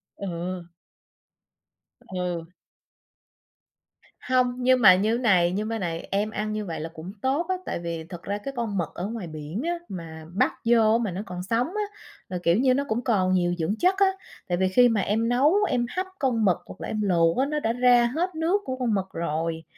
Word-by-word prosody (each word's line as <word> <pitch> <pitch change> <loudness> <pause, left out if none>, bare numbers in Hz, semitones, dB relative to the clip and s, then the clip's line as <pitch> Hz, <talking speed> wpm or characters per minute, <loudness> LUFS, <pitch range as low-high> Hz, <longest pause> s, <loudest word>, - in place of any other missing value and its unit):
Ờ. 180 -1 -5 1.3
Ừ. 180 -3 -4 1.7
Hông, 255 -1 +1
nhưng 255 0 +3
mà 190 -4 +9
như 215 +5 +1
thế - - -5
này, 180 -6 +4
như 205 +3 -2
mấy 225 +1 -3
này 170 -3 -4
em 205 +2 +1
ăn 215 0 -3
như 215 0 -3
vậy 165 -4 -4
là 160 +2 -5
cũng 170 +3 -8
tốt 275 +6 +1
á, 375 - +2
tại - - -3
vì 170 -1 -4
thật 175 -2 -8
ra 200 +1 -2
cái 270 +7 -6
con 225 -4 -2
mực 170 -4 -1
ở 180 - -3
ngoài 220 -4 -5
biển 155 +6 -5
á, 340 +2 0 0.2
mà 160 -3 -8
bắt 195 - +2
vô 225 -1 +5
mà 225 -5 -1
nó 185 +3 -4
còn 180 -2 -6
sống 230 +7 0
á, 420 +5 -2 0.5
là, 180 - -3
kiểu 170 +2 +4
như, 255 +2 +4
nó 280 +2 +1
cũng 225 +3 -1
còn 190 -6 +2
nhiều 175 -1 +2
dưỡng 175 +5 -1
chất 370 +2 +3
á. 395 - +5 0.4
Tại 175 - +1
vì 190 +1 +2
khi 245 +5 +5
mà 220 -3 +1
em 225 +4 0
nấu 265 +7 +4 0.2
em 245 -2 +1
hấp 370 +1 0
con 235 -6 +1
mực 180 -3 +3
hoặc - - -10
là - - -4
em 215 - -2
luộc 170 -4 +2
á, 265 - +3
nó 300 +1 -1
đã 225 -5 0
ra 245 -1 +5
hết 355 +2 -1
nước 340 +6 +1
của 260 - -3
con 240 -4 0
mực 195 -2 0
rồi. 165 0 -2
210 Hz, 220 wpm, -25 LUFS, 175-245 Hz, 1.7 s, mà